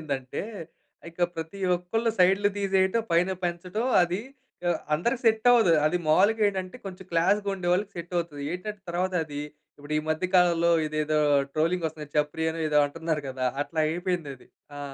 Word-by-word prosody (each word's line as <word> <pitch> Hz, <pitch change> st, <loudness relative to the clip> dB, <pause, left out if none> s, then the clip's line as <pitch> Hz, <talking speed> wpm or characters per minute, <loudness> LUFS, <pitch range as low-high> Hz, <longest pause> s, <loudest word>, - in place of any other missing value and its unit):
అయిపోయిందంటే 135 Hz, -4 st, -4 dB, 0.7 s
ఇక 170 Hz, +1 st, -5 dB
ప్రతి 165 Hz, +4 st, -6 dB, 0.2 s
ఒక్కళ్ళు 225 Hz, +6 st, -1 dB
సైడులు 195 Hz, +3 st, +4 dB
తీసేయటం 195 Hz, +2 st, +2 dB
పైన 175 Hz, +3 st, +3 dB
పెంచటం. 180 Hz, +6 st, -2 dB, 0.2 s
అది 175 Hz, +3 st, -1 dB, 0.5 s
ఆహ్, 170 Hz, -2 st, 0 dB
అందరికి 235 Hz, +11 st, 0 dB
సెట్టవ్వదు. 225 Hz, -4 st, +5 dB
అదీ 180 Hz, +3 st, +1 dB
మావూలుగా 205 Hz, +8 st, +4 dB
ఏటంటే 190 Hz, +1 st, -4 dB
కొంచెం 190 Hz, 0 st, -8 dB
క్లాస్‌గా 200 Hz, +5 st, +2 dB
ఉండేవాళ్ళకి 185 Hz, +2 st, 0 dB
సెట్టవుతది. 170 Hz, -4 st, -4 dB
ఏటంటే 205 Hz, +3 st, -6 dB
తర్వాతది 170 Hz, -5 st, -2 dB, 0.4 s
ఇప్పుడు 145 Hz, +1 st, -5 dB
ఈ -, -, 0 dB
మధ్య 155 Hz, +3 st, 0 dB
కాలంలో 170 Hz, -2 st, +4 dB, 0.2 s
ఇదేదో 155 Hz, 0 st, 0 dB, 0.3 s
ట్రోలింగొస్తుంది. 160 Hz, -2 st, -1 dB
చప్రియనో 160 Hz, +2 st, 0 dB
ఏదో 150 Hz, -1 st, +3 dB
అంటున్నారు 160 Hz, 0 st, -3 dB
కదా! 130 Hz, -1 st, -3 dB, 0.2 s
అట్లా 160 Hz, +2 st, -8 dB
అయిపోయిందది. 165 Hz, -5 st, -3 dB, 0.3 s
ఆ! -, -, -6 dB
175 Hz, 135 wpm, -26 LUFS, 155-190 Hz, 0.7 s, సెట్టవ్వదు